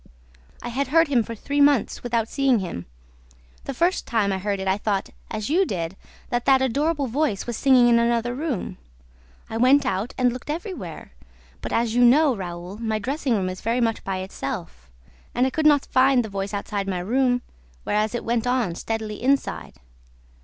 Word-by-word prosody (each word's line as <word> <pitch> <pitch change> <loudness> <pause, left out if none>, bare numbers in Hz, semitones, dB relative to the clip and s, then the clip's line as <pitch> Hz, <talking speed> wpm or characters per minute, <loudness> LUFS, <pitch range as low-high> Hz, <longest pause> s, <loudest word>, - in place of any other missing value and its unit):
"I 240 - -4
had 265 +3 -1
heard 325 +2 +4
him 255 -4 +3
for 230 +1 -6
three 285 +6 -1
months 285 -6 +3
without 230 -2 -1
seeing 270 -1 +2
him. 175 - -5 0.8
The 275 - -4
first 350 +7 +1
time 210 -4 +1
I 190 - -2
heard 200 0 -2
it, 190 - -4
I 190 +2 +1
thought, 200 -2 -1 0.2
as 215 +4 -4
you 365 +5 +4
did, 175 - -3 0.4
that 240 0 -1
that 270 -1 +5
adorable 285 +4 0
voice 250 -5 -1
was 240 - -4
singing 255 -2 +5
in 235 -1 +5
another 235 +1 +1
room. 270 - -4 0.7
I 225 - -4
went 265 +4 +5
out 210 0 -2
and 250 -2 +2
looked 250 +3 -9
everywhere; 315 - -6 0.5
but, - - -5
as 230 -1 +1
you 245 +1 +4
know, 270 +2 +5
Raoul, 180 0 -7
my 220 -1 -1
dressing 265 +2 -1
room 190 -3 0
is 185 0 -5
very 230 +3 0
much 225 -2 0
by 195 -1 -2
itself; 100 - -6 0.5
and 250 - +3
I 265 - 0
could 310 +2 +2
not 290 -2 +4
find 255 -2 +3
the - - -7
voice 195 0 -4
outside 200 -1 -3
my 190 -2 -1
room, 245 +5 +1 0.4
whereas 215 +2 0
it 240 - -4
went 235 +1 0
on 245 -8 +1
steadily 220 +3 -4
inside. 275 +3 0
235 Hz, 190 wpm, -24 LUFS, 205-270 Hz, 0.8 s, that